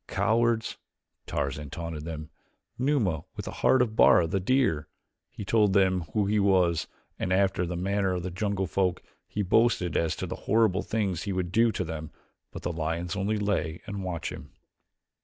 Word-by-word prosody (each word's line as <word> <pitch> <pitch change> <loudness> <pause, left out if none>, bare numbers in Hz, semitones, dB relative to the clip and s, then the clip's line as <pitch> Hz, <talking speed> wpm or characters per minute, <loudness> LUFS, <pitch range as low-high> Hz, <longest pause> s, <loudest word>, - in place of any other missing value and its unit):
"Cowards," 115 0 +1 0.5
Tarzan 70 +1 -3
taunted 80 0 -6
them. 80 -2 -6 0.5
"Numa 125 - +1
with - - -6
a - - -3
heart 130 -1 +5
of 110 -3 -4
Bara, 90 - +6
the 95 +4 -1
deer." 100 - +1 0.4
He 105 - -8
told 105 -1 +3
them 95 -3 +3
who 105 - +2
he 105 +1 +2
was, 90 -5 +3 0.3
and 90 - -2
after 95 -2 +2
the 90 - -3
manner 95 +1 0
of 90 - -3
the 90 - -4
jungle 100 +1 -1
folk 95 -1 0 0.2
he 105 - -2
boasted 95 -4 +2
as 80 -2 +1
to - - -4
the - - -5
horrible 110 -3 +3
things 100 -6 -1
he 100 - -3
would 90 -1 -2
do 115 +3 +4
to - - -1
them, 80 -2 -6 0.4
but - - -8
the 85 - -2
lions 85 +3 -2
only 100 +2 0
lay 100 -6 -1
and 100 -2 -5
watched 90 -3 -3
him. - - -9
95 Hz, 180 wpm, -28 LUFS, 85-105 Hz, 0.5 s, Bara